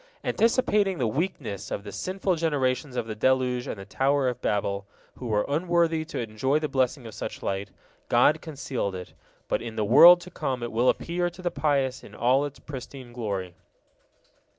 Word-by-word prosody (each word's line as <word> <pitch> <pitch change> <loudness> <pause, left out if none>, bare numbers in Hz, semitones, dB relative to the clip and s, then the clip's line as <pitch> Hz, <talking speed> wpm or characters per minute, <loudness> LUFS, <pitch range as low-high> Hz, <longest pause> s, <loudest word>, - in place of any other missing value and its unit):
Anticipating 210 -5 +2
the 125 - 0
wickedness 115 - -3
of 100 - -4
the 100 - -8
sinful 185 - -1
generations 145 -4 0
of 120 - -1
the 110 - -5
deluge 125 +2 +1
and - - -4
the 100 - -9
Tower 135 +6 +1
of 125 - -6
Babel, 100 -1 -1 0.3
who 125 - -5
were 105 -2 +1
unworthy 165 +1 +1
to 165 - -7
enjoy 120 +5 0
the 155 0 -1
blessing 130 -1 0
of 110 - -8
such 110 0 -6
light, 100 0 -2 0.4
God 130 +6 +4
concealed 135 - -4
it, 90 -1 -8 0.3
but - - 0
in 115 -1 -6
the 110 -1 0
world 170 +11 +9
to 180 - -11
come 130 -7 -3
it 120 - -4
will 120 +3 +3
appear 175 +1 0
to 175 +2 -13
the 175 - 0
pious 135 -4 0
in 105 - -13
all 130 +5 +3
its 145 -1 -7
pristine 130 -3 -9
glory. 100 -7 -3
130 Hz, 185 wpm, -26 LUFS, 110-155 Hz, 0.4 s, world